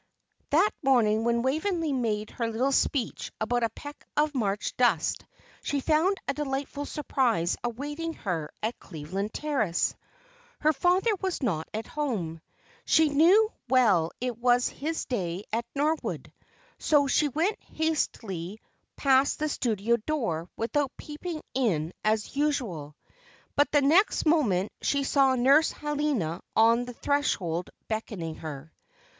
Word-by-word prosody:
That 345 +8 +4
morning 225 -5 +3
when 235 0 +1
Waveney 320 +3 0
made 215 -4 -1
her 230 - -2
little 240 +5 0
speech 270 -2 0
about 240 +3 0
a 230 - +1
peck 290 +6 -10
of 300 0 +2
March 205 -6 -1
dust, 225 -11 +2 0.4
she 285 - -1
found 320 +7 +2
a 275 - +1
delightful 285 0 -3
surprise 235 - 0
awaiting 290 +7 -4
her 170 - -3
at 225 +3 -2
Cleveland 185 +6 -5
Terrace. 240 - 0 0.7
Her 310 +1 +4
father 365 - +2
was 375 -6 -2
not 165 -10 -1
at 220 +1 -4
home. 200 - -3 0.4
She 320 -1 +4
knew 365 +10 +5 0.2
well 210 -11 +4
it 245 -2 -3
was 245 0 +3
his 320 +3 -4
day 185 -6 -3
at 230 +1 -1
Norwood, 305 +3 -1 0.5
so 295 -2 +3
she 295 +2 +2
went 325 - -1
hastily 220 - -2 0.4
past 270 0 +3
the 305 0 -1
studio 235 -3 +1
door 215 - -2
without 270 +4 -1
peeping 310 +2 -6
in 180 -11 0
as 215 +3 0
usual; 230 - -1 0.6
but 290 - +3
the 290 -2 +4
next 340 +10 +4
moment 225 - +2
she 280 -1 +1
saw 270 -1 +3
Nurse 275 +6 +5
Helena 290 - -2
on 230 +2 +4
the 245 - -8
threshold 190 - -1 0.2
beckoning 210 -7 -4
her. 155 0 -8
255 Hz, 135 wpm, -27 LUFS, 210-295 Hz, 0.7 s, knew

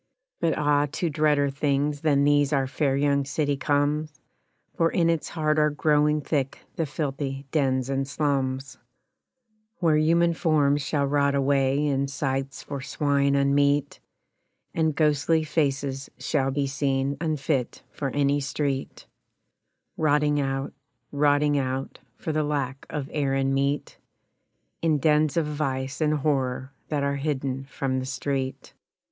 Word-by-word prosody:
But, 165 - +1
ah! 145 0 +2
to 170 -1 -1
dreader 145 -1 +2
things 145 +1 0
than 145 -3 +3
these 145 -1 +3
our 135 -2 +2
fair 135 +1 0
young 140 0 +2
city 145 +1 -1
comes, 145 +2 0 0.6
For 165 - +3
in 170 -1 +2
its 165 -2 -2
heart 155 -2 0
are 150 0 +4
growing 150 0 +2
thick 140 -2 -1 0.2
the 165 - -1
filthy 140 -1 -3
dens 130 -4 +1
and 135 0 -1
slums, 135 -2 -1 1.0
Where 165 -6 +3
human 170 +2 +3
forms 145 -3 +2
shall 140 +1 0
rot 140 0 +2
away 140 +1 +2
in 140 -1 +1
sties 135 0 -3
for 140 -2 -6
swine 140 0 +1
unmeet, 140 +1 +2 0.7
And 160 -2 +1
ghostly 155 +1 +2
faces 140 -3 -1
shall 135 -3 0
be 140 +1 0
seen 135 0 0
unfit 150 -5 -1
for 140 - -3
any 145 +1 +1
street 140 -1 -3 0.9
Rotting 150 -1 +2
out, 135 0 -2 0.4
rotting 145 0 +3
out, 130 0 -3 0.2
For 160 - -3
the 155 0 +1
lack 140 -2 -3
of 145 -3 -4
air 140 -3 0
and 135 0 +1
meat 140 +1 -1 0.8
In 160 -2 +2
dens 150 +1 +2
of 165 - +2
vice 135 -2 -3
and 155 0 +2
horror 135 -2 -1
that 145 -2 -1
are 140 0 0
hidden 135 -2 -2
from 135 -1 -2
the 130 - -4
street. 135 0 -3
145 Hz, 140 wpm, -25 LUFS, 135-150 Hz, 1.0 s, are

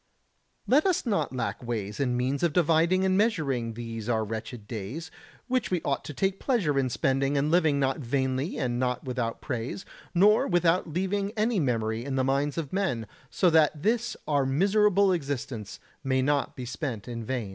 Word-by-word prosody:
95. 220 - 0
Let 310 +7 +5
us 360 - 0
not 200 - 0
lack 120 -2 -3
ways 110 -3 -4
and 125 -3 +1
means 130 +3 -1
of 170 -3 +1
dividing 170 +2 +3
and 190 0 +2
measuring 140 - 0
these 115 -1 -6
our 110 -2 +1
wretched 110 +1 -6
days, 120 - -6 0.4
which 255 -1 0
we 180 - +1
ought 140 - -1
to 150 - -6
take 195 +4 0
pleasure 180 - +1
in 130 -1 +1
spending 135 +3 +1
and 145 +2 +1
living 160 -5 +3
not 135 0 0
vainly 130 +3 -1
and 120 -1 -1
not 125 -1 -1
without 125 -3 -3
praise, 130 +7 -4 0.3
nor 210 +5 +5
without 175 -1 +2
leaving 195 +4 -1
any 215 0 +2
memory 115 -5 0
in 135 0 -3
the 130 - +2
minds 140 +3 0
of 160 -2 -4
men, 180 - 0 0.2
so 180 -3 +2
that 155 -1 +4
this 230 +7 0
our 145 -2 +2
miserable 195 +7 +3
existence 135 - -4 0.2
may 130 -1 +1
not 145 +1 0
be 125 - -6
spent 125 -4 -4
in 115 -1 -5
vain. 120 -3 -3
140 Hz, 185 wpm, -27 LUFS, 125-180 Hz, 0.4 s, Let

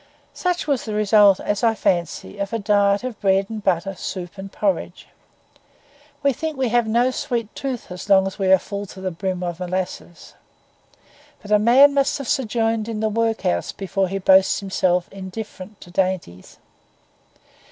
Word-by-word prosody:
Such 360 -1 -1
was 280 -5 0
the 215 -2 -4
result, 210 -2 +5
as 205 +3 -2
I 225 -1 +3
fancy, 175 +1 -2
of 200 +2 -3
a - - +1
diet 200 0 +2
of 250 -4 -6
bread 195 +1 +2
and 215 -2 -6
butter, 190 +1 0
soup 185 0 -7
and 195 0 -8
porridge. 190 -3 -2 1.2
We 280 -1 +3
think 315 +3 -4
we 260 -2 0
have 240 0 +2
no 240 +3 +2
sweet 245 -6 -3
tooth 255 -8 -5
as 180 +3 -8
long 190 -1 +5
as 195 +2 -5
we 195 - 0
are 190 - +8
full 200 +2 -6
to 190 - -12
the 190 -1 -3
brim 185 +1 -3
of 175 -1 -4
molasses; 180 -1 -5 1.1
but 205 - -9
a 210 - +5
man 260 +6 +6
must 275 -1 +1
have 275 -3 -6
sojourned 225 -3 0
in 220 -2 -3
the 220 0 0
workhouse 225 - 0
before 195 0 -2
he 195 +2 -3
boasts 190 0 +4
himself 185 -2 0
indifferent 195 +1 -8
to 175 - -13
dainties. 180 - -3
200 Hz, 175 wpm, -21 LUFS, 190-230 Hz, 1.2 s, are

